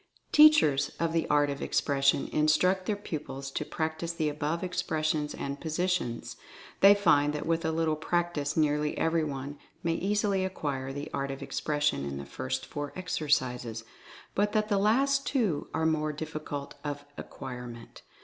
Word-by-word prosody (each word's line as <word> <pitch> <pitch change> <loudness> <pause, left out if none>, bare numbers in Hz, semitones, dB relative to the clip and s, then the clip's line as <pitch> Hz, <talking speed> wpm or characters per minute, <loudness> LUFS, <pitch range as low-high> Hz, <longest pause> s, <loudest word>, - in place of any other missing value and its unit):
Teachers 300 - +6
of 165 -1 0
the 165 - 0
Art 145 -1 +3
of 140 - -5
Expression 140 -1 +2
instruct 180 +5 +2
their 210 - +1
pupils 145 -8 -6
to - - -2
practice 160 +1 -3
the 160 -2 -1
above 150 +3 -2
expressions 160 -4 -1
and 140 0 -5
positions. 165 -7 -2 0.4
They 200 +1 +8
find 150 -7 +3
that 150 - -3
with 165 +1 0
a 160 - 0
little 160 -1 +1
practice 160 -2 -1
nearly 150 -1 +1
every 165 0 +2
one 140 -1 -5 0.2
may 165 -1 +1
easily 200 +1 +1
acquire 140 -8 -3
the 145 +1 -6
art 140 0 -2
of 135 +1 -5
expression 145 - 0
in 70 -1 -4
the 70 - -6
first 130 - -4
four 145 -1 -5
exercises, 125 -10 -1 0.5
but 205 +1 +1
that 215 -1 +1
the 200 -2 +2
last 275 +7 +2
two 210 - 0
are 160 - 0
more 155 -1 +1
difficult 150 -2 -5
of 145 -1 -4
acquirement. 125 -2 -8
155 Hz, 160 wpm, -29 LUFS, 140-180 Hz, 0.5 s, They